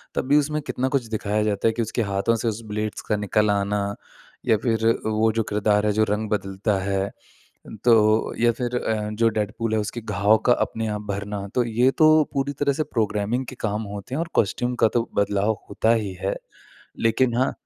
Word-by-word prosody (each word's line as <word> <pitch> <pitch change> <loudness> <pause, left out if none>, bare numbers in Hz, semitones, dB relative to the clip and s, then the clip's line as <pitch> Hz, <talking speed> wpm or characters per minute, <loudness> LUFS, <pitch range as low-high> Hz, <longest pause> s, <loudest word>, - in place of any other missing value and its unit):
तब - - -1
भी 145 +2 +5
उसमें 150 +1 0
कितना 130 - -1
कुछ 135 -3 0
दिखाया 105 -1 -1
जाता 105 0 0
है - - +4
कि 115 - -2
उसके 115 +1 -2
हाथों 100 +2 0
से 115 +1 -2
उस 110 0 -2
ब्लेड्स 105 0 -3
का 105 - +3
निकल 105 +1 +1
आना 100 0 0 0.7
या 110 - +4
फ़िर 115 0 0 0.2
वो 110 +1 +2
जो 115 +1 0
किरदार 105 0 +2
है 105 - +3
जो 110 +1 +3
रंग 105 +1 -1
बदलता 100 0 -1
है 100 0 -1 0.8
तो 110 -2 +4
या 120 0 +4
फ़िर 125 0 -3
अ, 110 -3 -1
जो 115 +2 +2
डेडपूल 110 +1 -2
है - - +2
उसके 105 +3 -4
घाव 105 0 +2
का 125 - +6
अपने 115 -2 -1
आप - - -5
भरना। 100 0 -4
तो 125 - +2
ये 120 +3 +2
तो 155 - +7 0.2
पूरी 140 +1 -1
तरह 140 -1 +3
से 145 - -1
प्रोग्रामिंग 110 +3 0
के 130 - -9
काम 105 0 -1
होते 100 +6 -6
हैं 150 - -1
और 170 - -2
कॉस्ट्यूम 120 +4 +1
का - - +6
तो 115 - -2
बदलाव 100 +1 +1
होता 110 +3 +2
ही 100 - -5
है। 95 - 0 0.7
लेकिन 115 +2 +2
हाँ 130 +2 +2
110 Hz, 205 wpm, -23 LUFS, 105-120 Hz, 0.8 s, तो